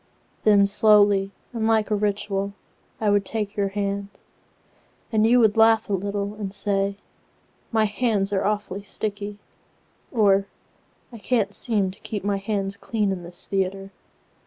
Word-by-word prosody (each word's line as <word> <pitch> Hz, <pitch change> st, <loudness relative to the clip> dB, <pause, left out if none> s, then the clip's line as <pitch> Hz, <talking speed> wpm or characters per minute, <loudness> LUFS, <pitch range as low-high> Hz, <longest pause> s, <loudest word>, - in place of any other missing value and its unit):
Then 205 Hz, -2 st, +5 dB
slowly 205 Hz, -1 st, +4 dB, 0.2 s
and 225 Hz, -2 st, -1 dB
like 220 Hz, -1 st, +2 dB
a -, -, +3 dB
ritualI 200 Hz, -1 st, -1 dB, 0.5 s
would 205 Hz, -2 st, +3 dB
take 210 Hz, 0 st, -3 dB
your 200 Hz, -1 st, +1 dB
hand, 200 Hz, 0 st, -3 dB, 1.0 s
And 220 Hz, -1 st, +3 dB
you 245 Hz, +2 st, +5 dB
would 220 Hz, -2 st, +3 dB
laugh 225 Hz, -1 st, +4 dB
a -, -, +1 dB
little 200 Hz, +1 st, -2 dB
and 205 Hz, -2 st, -5 dB
say,"My 200 Hz, +2 st, -3 dB
hands 210 Hz, -2 st, 0 dB
are 195 Hz, -, +1 dB
awfully 205 Hz, -1 st, -2 dB
sticky"—or"I 205 Hz, +1 st, -4 dB
can't 220 Hz, -1 st, 0 dB
seem 205 Hz, -6 st, 0 dB
to 195 Hz, -, -17 dB
keep 210 Hz, -3 st, -5 dB
my 200 Hz, 0 st, 0 dB
hands 195 Hz, -1 st, -3 dB
clean 210 Hz, -4 st, -1 dB
in 185 Hz, -2 st, -3 dB
this 175 Hz, 0 st, -6 dB
theatre." 195 Hz, 0 st, -2 dB
205 Hz, 135 wpm, -24 LUFS, 195-215 Hz, 1.0 s, Then